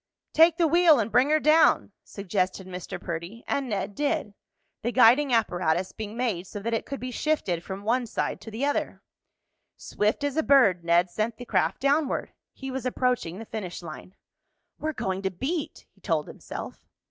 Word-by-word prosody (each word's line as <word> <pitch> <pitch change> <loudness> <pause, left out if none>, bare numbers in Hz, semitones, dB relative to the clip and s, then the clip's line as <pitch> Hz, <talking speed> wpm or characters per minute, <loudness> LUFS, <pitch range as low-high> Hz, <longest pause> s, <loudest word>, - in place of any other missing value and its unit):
"Take 325 +1 +6
the 340 - +3
wheel 335 -1 +6
and 225 0 -1
bring 250 +6 +4
her 310 0 +4
down," 310 -6 +4
suggested 190 -1 -2
Mr. 180 -1 -7
Perdy; 170 +7 -6
and 275 -2 -1
Ned 200 -1 -2
did, 295 -4 -1 0.5
the 240 - -1
guiding 255 +3 +5
apparatus 180 -6 +1
being 215 0 -7
made 210 -8 -1
so 205 - -7
that 230 +3 -3
it 225 - -2
could 275 - -5
be 255 0 -5
shifted 235 - -1
from 195 +2 -7
one 240 +3 +1
side - - -3
to - - -9
the 225 +6 -2
other. 290 - -2 0.7
Swift 210 +7 -1
as 285 0 -1
a - - +4
bird 250 - +4
Ned 175 +1 +3
sent 220 +4 -2
the 245 - -8
craft - - 0
downward. 280 +1 +1 0.2
He 270 -1 -7
was 260 -1 -3
approaching 250 -9 -1
the 225 - -8
finish 195 -6 -6
line. 170 +3 -10 0.6
"We're 315 0 -2
going 190 -7 -3
to 190 - 0
beat!" 280 - -4
he - - -29
told - - -1
himself. - - -8
230 Hz, 180 wpm, -26 LUFS, 190-280 Hz, 0.7 s, Take